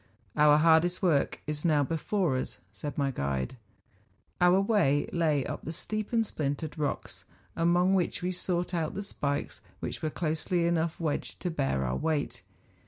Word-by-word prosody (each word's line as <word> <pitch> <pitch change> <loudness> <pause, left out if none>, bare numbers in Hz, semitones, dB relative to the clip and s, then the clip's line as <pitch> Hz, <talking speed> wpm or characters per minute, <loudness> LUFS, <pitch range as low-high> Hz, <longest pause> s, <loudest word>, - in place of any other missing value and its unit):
' - - -37
Our 150 0 +6
hardest 165 +4 +4
work 155 -6 +2
is 150 -1 -4
now 150 -4 +3
before 165 +1 0
us,' 130 - -3 0.2
said 145 +8 -6
my 140 -2 +1
guide. 70 - -2 0.9
Our 180 +2 +6
way 195 -9 +2
lay 155 -5 +2
up - - -5
the 160 - -4
steep 215 +5 -4
and 230 -2 +2
splintered 150 -2 -3
rocks, 150 -2 -3 0.3
among 175 +3 +3
which 180 -1 0
we 180 - 0
sought 180 0 -2
out 165 -3 -1
the 200 - -3
spikes 145 -7 -3 0.2
which - - -5
were 155 - 0
closely 165 +2 -1
enough 170 -1 0
wedged 155 -4 -2
to 180 - -1
bear 135 - 0
our 65 +1 -1
weight. 155 -3 -1
160 Hz, 170 wpm, -29 LUFS, 145-180 Hz, 0.9 s, Our